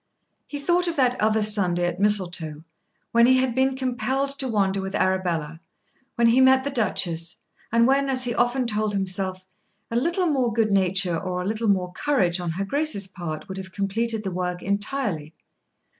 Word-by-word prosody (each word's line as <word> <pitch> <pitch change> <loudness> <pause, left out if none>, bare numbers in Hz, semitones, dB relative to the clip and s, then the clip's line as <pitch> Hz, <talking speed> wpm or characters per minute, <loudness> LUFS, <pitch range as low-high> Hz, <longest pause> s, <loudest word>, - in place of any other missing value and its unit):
He 290 - -6
thought 350 +5 +1
of 335 - -2
that 255 -4 +2
other 215 0 +2
Sunday 185 -5 +4
at 175 +1 -3
Mistletoe, 175 -7 +1 0.5
when 235 +1 +5
he 260 0 +5
had 255 -2 0
been 265 +1 +1
compelled 260 +1 -2
to 265 - 0
wander 195 -4 0
with 190 +1 -5
Arabella, 170 -4 -1 0.6
when 235 - +2
he 235 +3 +4
met 260 0 +5
the 280 - -3
Duchess, 175 -8 0 0.3
and 230 +1 +4
when, 275 +2 +2
as 255 -1 +2
he 245 -1 0
often 245 +2 0
told 215 -2 -1
himself, 185 -1 -2 0.5
a - - -3
little 340 +9 0
more 265 -7 +1
good 220 -1 0
nature 190 -3 +2
or 180 -1 -4
a - - -4
little 220 +2 -2
more 185 -2 0
courage 190 -9 0
on 175 -1 -4
her 195 +4 -3
grace's 285 -4 0
part 175 -5 -7
would 190 -1 -7
have 190 0 -8
completed 215 +3 -2
the 190 - -4
work 180 0 -4
entirely. 200 - -2
210 Hz, 185 wpm, -23 LUFS, 185-255 Hz, 0.6 s, when